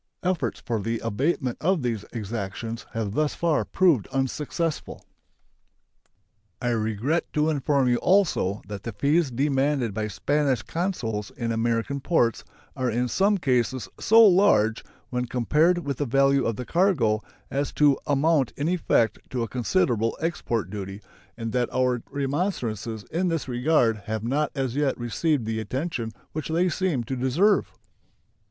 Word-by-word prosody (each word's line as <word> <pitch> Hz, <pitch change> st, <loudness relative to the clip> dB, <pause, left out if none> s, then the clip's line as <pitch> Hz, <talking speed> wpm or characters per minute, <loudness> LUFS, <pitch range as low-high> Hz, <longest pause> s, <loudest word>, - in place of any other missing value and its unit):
Efforts 180 Hz, -3 st, -1 dB
for 115 Hz, -2 st, -2 dB
the 115 Hz, +3 st, -2 dB
abatement 130 Hz, +3 st, -1 dB
of 175 Hz, -3 st, +1 dB
these 115 Hz, -4 st, -1 dB
exactions 110 Hz, 0 st, -5 dB
have 110 Hz, -3 st, -2 dB
thus 150 Hz, +3 st, 0 dB
far 170 Hz, -2 st, +1 dB
proved 170 Hz, -, +2 dB
unsuccessful. 145 Hz, +5 st, -3 dB, 1.5 s
I 125 Hz, -, -1 dB
regret 115 Hz, +7 st, -1 dB
to 155 Hz, +1 st, +2 dB
inform 140 Hz, -2 st, +1 dB
you 120 Hz, -1 st, +3 dB
also 160 Hz, -, +2 dB
that 100 Hz, -2 st, -6 dB
the 115 Hz, -, -6 dB
fees 145 Hz, +8 st, +2 dB
demanded 135 Hz, -2 st, 0 dB
by 110 Hz, +1 st, -2 dB
Spanish 135 Hz, +2 st, 0 dB
consuls 115 Hz, -, -3 dB
in 115 Hz, -2 st, -2 dB
American 115 Hz, +4 st, 0 dB
ports 130 Hz, -, +1 dB, 0.3 s
are 130 Hz, -1 st, -1 dB
in 120 Hz, +2 st, 0 dB
some 200 Hz, -, +2 dB
cases 130 Hz, -, 0 dB
so 225 Hz, +1 st, +7 dB
large, 115 Hz, -, +4 dB, 0.3 s
when 125 Hz, 0 st, -1 dB
compared 150 Hz, +9 st, +2 dB
with 140 Hz, -6 st, -3 dB
the 145 Hz, -, -1 dB
value 135 Hz, +2 st, +3 dB
of 115 Hz, -, -1 dB
the 125 Hz, -, -6 dB
cargo, 145 Hz, -, +2 dB, 0.3 s
as 140 Hz, +1 st, -1 dB
to 145 Hz, -2 st, +4 dB
amount 145 Hz, -1 st, +2 dB
in 145 Hz, -, -1 dB
effect 150 Hz, -, +1 dB
to 125 Hz, -2 st, -2 dB
a -, -, -3 dB
considerable 120 Hz, -, 0 dB
export 120 Hz, -, -2 dB
duty, 100 Hz, -1 st, -6 dB, 0.4 s
and 115 Hz, -1 st, -4 dB
that 125 Hz, +1 st, 0 dB
our 125 Hz, -2 st, +1 dB
remonstrances 130 Hz, -, -2 dB
in 180 Hz, +3 st, 0 dB
this 165 Hz, -5 st, -1 dB
regard 125 Hz, -2 st, +2 dB
have 110 Hz, +1 st, -4 dB
not 140 Hz, +5 st, 0 dB
as 135 Hz, -3 st, -2 dB
yet 145 Hz, -2 st, +1 dB
received 125 Hz, +2 st, 0 dB
the 110 Hz, 0 st, -2 dB
attention 125 Hz, -, -3 dB, 0.2 s
which 155 Hz, -1 st, -4 dB
they 170 Hz, +3 st, +2 dB
seem 170 Hz, -7 st, 0 dB
to 130 Hz, +3 st, -4 dB
deserve. 145 Hz, +12 st, +2 dB
130 Hz, 150 wpm, -25 LUFS, 115-155 Hz, 1.5 s, so